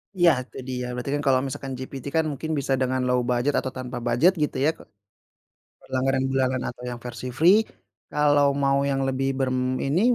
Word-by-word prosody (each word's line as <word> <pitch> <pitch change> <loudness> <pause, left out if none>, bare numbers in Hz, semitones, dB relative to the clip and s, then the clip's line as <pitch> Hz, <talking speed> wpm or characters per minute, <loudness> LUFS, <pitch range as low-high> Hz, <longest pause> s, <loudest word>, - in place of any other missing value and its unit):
Iya, 175 -2 +6 0.2
jadi 130 0 -6
ya, - - -3
berarti 125 +3 -4
kan 145 - -2
kalau 130 -1 +5
misalkan 135 0 -5
GPT 130 0 -7
kan 160 -1 +3
mungkin 160 +3 -4
bisa 135 0 -1
dengan 130 0 +1
low 125 0 +2
budget 125 +4 +1
atau 130 - -4
tanpa 125 -1 -5
bujet, 120 +10 +4
gitu, - - -2
ya - - +5
ke - - -14 1.1
langganan 130 0 +1
bulanan 130 -1 +1
atau 120 - -11
yang 120 -1 -6
versi 120 +1 -6
free. 180 +6 +6 0.5
Kalau 145 -1 +4 0.2
mau 140 0 +3
yang 135 0 0
lebih 135 0 -1
berini, 130 +5 0
135 Hz, 185 wpm, -25 LUFS, 130-145 Hz, 1.1 s, Iya